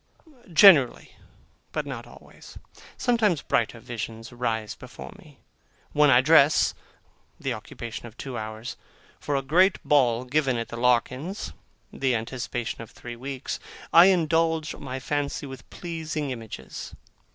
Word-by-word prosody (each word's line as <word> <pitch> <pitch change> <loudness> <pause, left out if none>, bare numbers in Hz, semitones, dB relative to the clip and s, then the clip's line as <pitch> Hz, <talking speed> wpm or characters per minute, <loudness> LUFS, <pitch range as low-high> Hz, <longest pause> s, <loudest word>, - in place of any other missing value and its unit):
Generally, 160 - +6 0.6
but - - -2
not - - -6
always. - - -14 0.4
Sometimes 215 - +2
brighter 115 0 0
visions 115 -1 -7
rise 115 -3 -2
before - - -11
me. - - -17 0.5
When 150 0 +4
I 125 -2 +7
dress 150 +1 +5 0.7
(the - - -2
occupation 115 0 -7
of 115 0 -15
two 135 -3 -6
hours), 110 +1 -6 0.4
for 145 - -2
a 135 - 0
great 180 +8 +4
ball 125 -5 +3
given 135 -1 +1
at 115 - -4
the - - -6
Larkins's 125 - 0 0.4
(the 130 -2 +1
anticipation 120 +1 -4
of 115 - -9
three 120 -1 -9
weeks), 135 +2 -5 0.3
I 170 +2 +10
indulge 165 -3 +2
my 130 -1 -6
fancy 145 +2 -2
with 135 -3 -10
pleasing 160 -4 -4
images. 110 - -8
135 Hz, 130 wpm, -26 LUFS, 120-155 Hz, 0.7 s, I